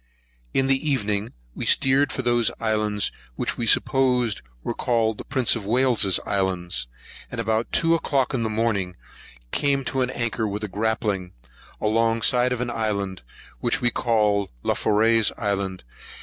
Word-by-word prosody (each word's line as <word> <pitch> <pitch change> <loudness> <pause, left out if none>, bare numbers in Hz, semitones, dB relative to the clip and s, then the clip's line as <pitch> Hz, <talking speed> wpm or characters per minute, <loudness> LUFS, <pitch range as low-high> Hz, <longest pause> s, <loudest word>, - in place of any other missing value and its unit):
In 135 - +2
the 135 +3 +1
evening, 105 -5 -1 0.2
we - - -5
steered 135 +1 +3
for - - -3
those 120 -2 +2
islands 105 -3 0 0.2
which - - -2
we 115 - -3
supposed 125 -3 +2 0.2
were - - -2
called 115 -3 0
the - - -5
Prince 130 -4 +2
of 105 -4 -6
Wales's 120 -6 +3
Islands; 90 -9 -2 0.4
and 120 - -6
about 110 0 -1
two 165 0 +3
o'clock 140 -5 0
in 125 - 0
the 110 - -1
morning, 105 -5 -1 0.6
came 140 -2 +1
to 130 - -1
an 125 - +1
anchor 120 -3 -1
with 105 +1 -4
a - - -2
grappling, 105 -2 -2 0.5
along 115 +1 +1
side 125 0 +4
of 125 -1 -1
an 125 -1 -2
island, 100 -4 -2 0.4
which - - +1
we 120 0 +2
called 105 -5 +1
Laforey's 110 +1 +3
Island. 100 - -2
115 Hz, 155 wpm, -24 LUFS, 105-125 Hz, 0.6 s, side